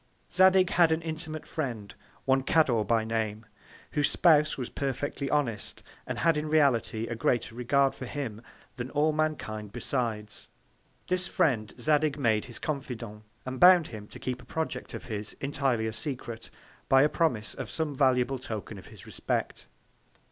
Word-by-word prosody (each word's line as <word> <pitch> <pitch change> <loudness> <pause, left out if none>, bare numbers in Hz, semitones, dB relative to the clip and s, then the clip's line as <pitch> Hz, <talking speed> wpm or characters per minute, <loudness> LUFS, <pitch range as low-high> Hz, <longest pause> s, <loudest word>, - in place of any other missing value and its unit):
Zadig 185 0 +5
had 170 -2 +5
an 160 +1 0
intimate 160 -1 -5
Friend, 120 -9 -4 0.3
one 135 0 +3
Cador 130 -6 +3
by 110 +2 +2
Name, 110 -1 -2 0.5
whose 145 -1 +2
Spouse 155 -3 +4
was 125 -3 -5
perfectly 140 +1 -3
honest, 125 -8 -1 0.2
and - - -3
had 165 -2 +3
in 150 0 -2
reality 130 -7 +2
a 120 - -4
greater 115 0 0
Regard 135 +3 +2
for 130 - -7
him, 120 -7 -5 0.4
than 125 +1 -4
all 150 +2 +2
Mankind 145 -10 -2
besides: 110 -4 -2 0.6
This 180 -1 0
Friend 115 -12 +1
Zadig 150 +3 +2
made 110 -6 +1
his 120 - -7
Confident, 125 -8 -5 0.2
and 130 0 -5
bound 180 -2 +7
him 105 -3 -8
to - - -10
keep 125 -1 -4
a - - -16
Project 160 0 -4
of - - -7
his 105 -2 -5
entirely 135 -5 -1
a 110 - -2
Secret, 120 -3 -5 0.4
by 135 +1 +6
a - - +5
Promise 150 -9 0
of - - -6
some 160 -2 -2
valuable 130 -1 +2
Token 110 -5 -6
of - - -13
his - - -12
Respect. - - -3
135 Hz, 160 wpm, -28 LUFS, 115-155 Hz, 0.6 s, bound